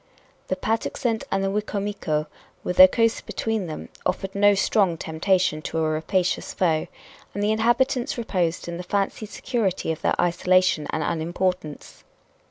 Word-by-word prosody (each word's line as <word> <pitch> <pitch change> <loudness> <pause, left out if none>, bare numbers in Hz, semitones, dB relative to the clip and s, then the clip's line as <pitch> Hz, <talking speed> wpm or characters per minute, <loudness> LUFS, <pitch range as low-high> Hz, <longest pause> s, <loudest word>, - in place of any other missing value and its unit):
The - - 0
Patuxent 225 0 -1
and 195 0 +1
the 195 - 0
Wicomico, 200 -6 -2 0.4
with 180 - -3
the 185 - +11
coast 230 +4 0
between 220 -5 -2
them, 155 - -7
offered 195 0 -2
no 205 0 +4
strong 195 -3 +2
temptation 160 0 0
to 165 - -4
a 160 -1 +1
rapacious 175 +4 -1
foe, 160 -4 +1 0.5
and 205 - -1
the 210 - +2
inhabitants 240 +4 +1
reposed 180 -9 -1
in 170 0 -4
the - - -5
fancied 200 +3 -2
security 215 -11 -1
of 160 - -5
their - - 0
isolation 180 -2 +2
and 155 - -1
unimportance. 170 -1 -3
185 Hz, 150 wpm, -24 LUFS, 165-210 Hz, 0.5 s, the